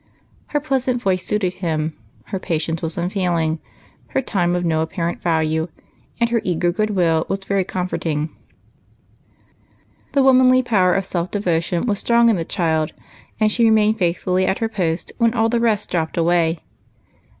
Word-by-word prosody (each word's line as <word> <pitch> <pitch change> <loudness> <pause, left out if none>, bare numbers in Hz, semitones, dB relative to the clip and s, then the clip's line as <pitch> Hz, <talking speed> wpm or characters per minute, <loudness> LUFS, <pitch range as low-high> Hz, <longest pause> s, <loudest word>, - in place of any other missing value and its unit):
Her 295 - 0
pleasant 260 -4 0
voice 185 -5 0
suited 200 -4 -1
him, 160 -2 -1 0.3
her 195 - -3
patience 165 -2 -2
was 165 0 -2
unfail 180 -1 0
ing, 160 0 -1 0.5
her - - -1
time 180 -6 0
of 175 0 -1
no 160 -1 +1
apparent 165 +1 -3
value, 160 -1 0 0.5
and 235 0 +1
her 230 -2 +2
eager 175 -1 +1
good 215 +4 -1
will 170 -5 +1
was 195 0 -3
very 195 -1 +1
comforting. 165 -4 -2 1.8
Tlie 275 - +4
womanly 255 -1 +5
power 190 -7 +3
of 195 -1 0
self 175 -2 -2
devotion 175 -3 0
was 205 -4 0
strong 235 0 +4
in - - +2
the 170 - -2
child, 160 -3 -1 0.5
and 215 -1 +3
she 235 - +2
remained 220 0 +3
faithfully 180 +1 +1
at 190 - +1
her 225 - -1
post 175 -6 -2
when 230 0 +3
all 225 -1 +2
the 235 0 +1
rest 220 -3 0
dropped 160 -2 -1
away. 170 -1 +2
185 Hz, 165 wpm, -20 LUFS, 165-220 Hz, 1.8 s, womanly